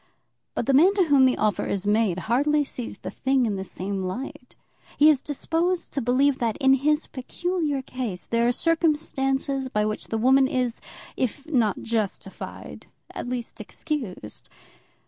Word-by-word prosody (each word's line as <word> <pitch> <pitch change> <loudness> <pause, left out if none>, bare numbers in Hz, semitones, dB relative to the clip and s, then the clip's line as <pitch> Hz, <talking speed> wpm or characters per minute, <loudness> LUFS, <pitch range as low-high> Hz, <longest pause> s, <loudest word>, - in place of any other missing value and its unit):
But - - -1
the 275 - +2
man 350 +9 +6
to 390 - +4
whom 280 -5 +5
the 255 - +1
offer 210 -4 +1
is 200 0 -2
made 205 -3 +2
hardly 290 +6 +2
sees 250 -4 -7
the - - -7
thing 265 -1 +1
in 210 -3 -1
the 190 - -3
same 190 +1 -4
light. 250 +6 -6 0.4
He 300 +1 +7
is 275 -4 0
disposed 330 +5 -1
to 275 - -1
believe 260 +3 +2
that, 230 -3 0
in 270 -2 +4
his 300 +3 +2
peculiar 295 +1 -2
case, 240 -9 -4
there 235 0 +1
are - - +4
circumstances 275 -4 0
by 210 -3 +1
which 215 0 -3
the 225 - -2
woman 265 +4 +5
is, 250 -3 -1 0.3
if 265 +3 -2
not 240 -10 +1
justified, 220 -4 -4 0.2
at - - -5
least 245 -2 -4
excused. 230 - -5
260 Hz, 165 wpm, -25 LUFS, 225-290 Hz, 0.4 s, He